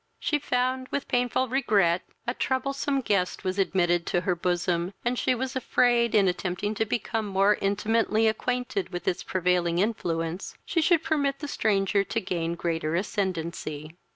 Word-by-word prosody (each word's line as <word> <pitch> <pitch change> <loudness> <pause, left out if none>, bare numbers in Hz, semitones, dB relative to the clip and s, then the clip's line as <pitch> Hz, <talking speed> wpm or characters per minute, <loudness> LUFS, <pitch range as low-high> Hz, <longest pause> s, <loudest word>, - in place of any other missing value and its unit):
She 330 -3 0
found, 255 -1 -1
with 280 - -3
painful 245 +1 +1
regret, 205 -9 +2 0.2
a 240 - -1
troublesome 275 +1 -1
guest 195 -6 0
was 185 +1 -2
admitted 175 -3 +2
to 175 - +1
her 185 - +1
bosom, 175 +1 -1
and 240 - +2
she 255 - +2
was 260 +2 -3
afraid, 240 -2 +2
in 200 -2 +5
attempting 185 +3 -1
to 220 +1 0
become 225 0 -2
more 195 +1 +3
intimately 215 +2 +2
acquainted 245 -3 -1
with 175 -1 -6
its 180 - 0
prevailing 180 -2 +1
influence, 175 -4 -2
she 330 - +1
should 330 0 +3
permit 285 -4 0
the 295 - -6
stranger 200 -6 +1
to - - -2
gain 170 -2 -2
greater 165 -2 -1
ascendancy. 170 -5 -3
200 Hz, 155 wpm, -27 LUFS, 175-250 Hz, 0.2 s, in